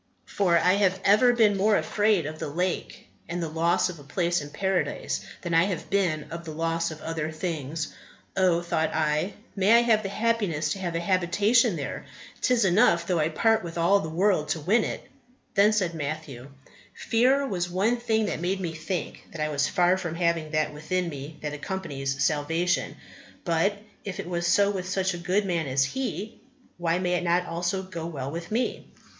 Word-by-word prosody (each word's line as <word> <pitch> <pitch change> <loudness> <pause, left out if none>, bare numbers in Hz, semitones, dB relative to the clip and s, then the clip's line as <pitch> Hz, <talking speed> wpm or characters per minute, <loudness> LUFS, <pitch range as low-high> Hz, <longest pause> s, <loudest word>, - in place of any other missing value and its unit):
For 180 -4 +2
I 180 +2 +4
have 190 -2 +2
ever 215 +5 +6
been 220 -4 +4
more 205 +2 +3
afraid 210 -6 +1
of 155 +1 -6
the - - -3
lake, 180 +5 -3 0.2
and 175 +1 -3
the 165 - -2
loss 165 +3 +1
of 180 -4 -7
a - - -12
place 170 +4 0
in 145 - -8
Paradise, 190 +3 -1 0.2
than 170 -2 -3
I 165 +2 +5
have 185 -5 -4
been 175 -6 +1
of 170 0 -6
the 165 - -8
loss 165 +1 -1
of 155 -1 -8
other 160 -1 -3
things. 155 -2 -4 0.4
Oh! 180 -3 +3
thought 160 -2 -1
I, 155 +5 0 0.2
may 200 +2 +4
I 235 - +7
have 225 -3 +3
the 195 - -4
happiness 200 -8 0
to 195 - -2
have 175 -3 -3
a - - +1
habitation 200 +5 +2
there: 140 -4 -5 0.3
'tis 245 -4 +3
enough 175 -2 +4
though 175 -1 0
I 155 +1 +2
part 220 +7 +2
with 170 0 -7
all 175 +4 +4
the 160 - -4
world 175 -1 +1
to 165 - 0
win 205 +9 +2
it." - - -4 0.5
Then 205 +2 +5
said 190 -6 0
Matthew, 145 -4 -5 0.5
"Fear 260 +5 +2
was 180 -7 -2
one 200 +7 +1
thing 220 -2 0
that 165 - -3
made 185 +2 -1
me 170 -3 -3
think 160 +2 -5
that 165 - -9
I 150 0 0
was 145 -1 +1
far 180 -1 +3
from 170 -3 -4
having 170 -2 0
that 155 -1 0
within 180 +4 -2
me 145 +1 -8
that 150 -1 -3
accompanies 145 -5 -3
salvation; 165 +5 0 0.5
but 175 +4 +1 0.3
if 195 -3 -6
it - - -5
was 175 -1 -1
so 200 +3 +4
with 185 -2 -4
such 190 0 0
a 175 - -6
good 185 +4 0
man 170 -5 -1
as 135 0 +2
he, 215 - -4 0.4
why 170 0 +1
may 180 -1 0
it 180 - 0
not 175 +1 +2
also 175 +3 -2
go 170 -3 -6
well 140 -5 -5
with 170 +2 -6
me?" 240 +3 -2
175 Hz, 200 wpm, -26 LUFS, 160-195 Hz, 0.5 s, I